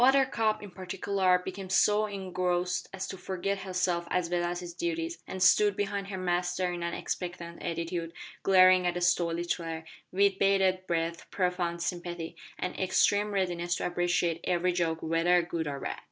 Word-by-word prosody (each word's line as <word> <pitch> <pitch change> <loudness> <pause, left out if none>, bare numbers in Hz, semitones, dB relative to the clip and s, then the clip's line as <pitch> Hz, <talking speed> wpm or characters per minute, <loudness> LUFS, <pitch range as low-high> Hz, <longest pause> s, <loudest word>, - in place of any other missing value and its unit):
Buttercup, 250 -5 +3
in 205 - -9
particular, 185 0 0
became 190 0 -6
so 210 +3 +4
engrossed 180 -2 -1
as 195 0 -4
to 190 - -6
forget 195 +1 -2
herself 180 -2 -1
as 180 -2 0
well 175 0 +1
as 175 +1 -2
her 175 - -6
duties, 165 -1 -2
and 185 -1 -2
stood 205 +1 +5
behind 200 -1 -2
her 195 -1 -5
master 180 0 0
in 175 - -5
an 170 0 -2
expectant 175 -1 -5
attitude, 170 0 -3 0.3
glaring 185 -1 +6
at 175 - 0
the 175 - -2
story 175 -1 +1
teller, 165 -2 -3 0.3
with 195 +1 +3
bated 190 -1 +2
breath, 170 0 -2
profound 180 -2 -1
sympathy, 175 -2 -4 0.2
and 180 - -4
extreme 205 +2 +3
readiness 175 -3 0
to - - -3
appreciate 175 -1 0
every 180 0 +1
joke 165 -2 -1
whether 165 +2 +3
good 165 -2 -3
or 140 -1 -3
bad. - - -4
180 Hz, 170 wpm, -29 LUFS, 170-190 Hz, 0.3 s, glaring